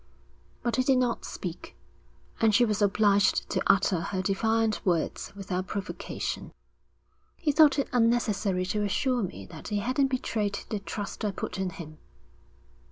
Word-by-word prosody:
But 235 -1 0
he 255 - +3
did 260 0 +3
not 245 -2 0
speak, 175 -2 -7 0.6
and 220 -2 +4
she 240 - +6
was 210 -2 -1
obliged 205 0 +3
to - - 0
utter 190 -2 +3
her 190 +2 -2
defiant 220 +3 +1
words 175 -4 -1
without 190 -2 -3
provocation. 200 -2 -4 0.8
'He 305 - 0
thought 300 -1 +6
it 280 - +1
unnecessary 215 -6 +2
to 210 +3 -1
assure 250 +5 +1
me 135 - -5
that - - -9
he 210 - -1
hadn't 255 +6 +1
betrayed 215 -6 -1
the 210 - -2
trust 205 +2 -6
I 210 - +1
put 190 -1 -5
in 190 -1 0
him.' 155 -3 -10
210 Hz, 155 wpm, -28 LUFS, 190-240 Hz, 0.8 s, she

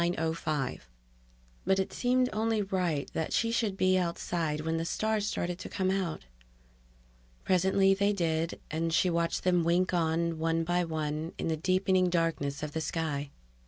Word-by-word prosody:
But 190 - +2
it 190 - -1
seemed 250 0 +2
only 220 0 +1
right 180 -7 -1
that 160 - -2
she 230 -1 +2
should 220 -4 0
be 185 0 +3
outside 170 -3 -2
when 160 +1 -1
the 165 - -1
stars 215 +4 0
started 175 -3 -2
to - - -7
come 190 -1 0
out. 185 - -2 1.2
Presently 190 +1 +3
they 200 +1 +2
did, 165 -4 -1
and 165 +1 -1
she 180 +2 +3
watched 170 0 0
them 180 -2 +3
wink 175 +3 +2
on, 165 -1 0
one 165 0 +1
by 175 +1 +1
one, 155 0 -3
in - - -2
the 160 - +1
deepening 185 +2 +2
darkness 165 -4 -1
of 150 - -3
the 160 - -3
sky. 150 -3 -2
170 Hz, 160 wpm, -30 LUFS, 160-190 Hz, 1.2 s, be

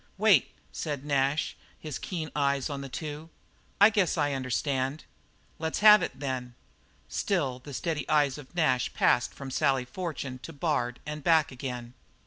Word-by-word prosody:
"Wait," 210 -2 +4 0.2
said 145 -3 -4
Nash, 140 +1 +1 0.2
his 150 -3 -5
keen 160 -4 -4
eyes 140 0 +1
on 140 -1 -4
the 135 - -7
two, 155 +3 -6 0.5
"I 205 +2 +8
guess 195 -5 +1
I 145 -2 +1
understand." 135 +2 -1 0.6
"Let's 160 +3 -2
have 210 0 +9
it, - - -4
then." 130 -3 -4 0.5
Still 140 -10 -1
the 145 +3 -11
steady 155 +2 -3
eyes 145 -2 +3
of 145 +4 -14
Nash 130 -7 +2
passed 120 - +3
from 135 -1 -8
Sally 130 -1 +2
Fortune 140 -4 -5
to 165 - -9
Bard 140 -5 -1
and 150 0 -5
back 160 -2 +4
again. 125 -2 -6
145 Hz, 155 wpm, -28 LUFS, 130-160 Hz, 0.6 s, have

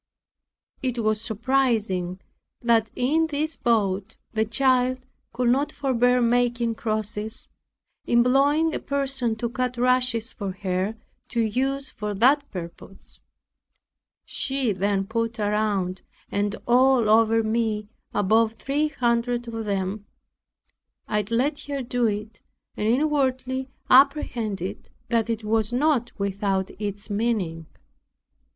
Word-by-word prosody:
It 255 -2 -2
was 215 0 +1
surprising 220 -6 0 0.4
that 230 -2 +2
in 310 +6 +2
this 310 +1 -2
boat 205 -3 0 0.2
the 220 0 +1
child 255 +2 +2 0.3
could 240 +1 0
not 275 +4 +2
forbear 250 -2 +2
making 235 -1 +2
crosses, 215 -1 -3 0.6
employing 275 +7 +3
a - - -1
person 270 -4 -1
to 235 +2 -2
cut 250 +1 -2
rushes 250 -1 +2
for 200 -5 -4
her 190 +2 -2 0.3
to 235 - -1
use 265 +5 -1
for 210 0 -4
that 280 +7 +3
purpose. 180 +1 -10 1.1
She 270 -4 -1
then 195 +1 0
put 230 +2 -2
around, 205 -3 0 0.3
and 205 +1 0
all 250 -1 +4
over 225 +1 +4
me, 220 -1 -1 0.2
above 220 +3 +2
three 280 +6 -1
hundred 240 -3 0
of 225 -1 -5
them. 200 +1 -2 1.0
I 210 -1 0
let 265 +6 +1
her 280 -2 -3
do 245 -1 +1
it, 210 0 -4 0.3
and 210 - -1
inwardly 260 -1 0 0.2
apprehended 240 - +2 0.2
that 230 -1 +1
it 225 -1 -2
was 220 0 0
not 255 -1 +1
without 195 -1 -1
its 205 0 -4
meaning. 200 -7 -1
230 Hz, 115 wpm, -24 LUFS, 210-255 Hz, 1.1 s, all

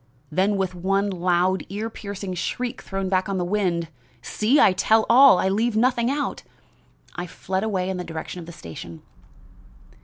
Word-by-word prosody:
Then 195 +5 +1
with 190 -1 -1
one 195 +3 0
loud 180 +1 +1
ear 210 +3 -3
piercing 200 -3 -6
shriek 235 +7 -3
thrown 195 0 -4
back 185 0 0
on 195 - -1
the 180 - -1
wind 175 -4 -1 0.3
see! 235 +7 +2
I 190 - +6
tell 220 +4 +3
all 260 -3 +8
I 190 - +1
leave 215 +3 +1
out - - +4
nothing 245 -1 +2 1.0
I 175 0 -5
fled 190 +3 -3
away 190 -4 -1
in 190 -1 -2
the 180 - -4
direction 165 +1 -6
of 165 - -10
the - - -8
station. 85 - -10
190 Hz, 175 wpm, -23 LUFS, 180-210 Hz, 1.0 s, all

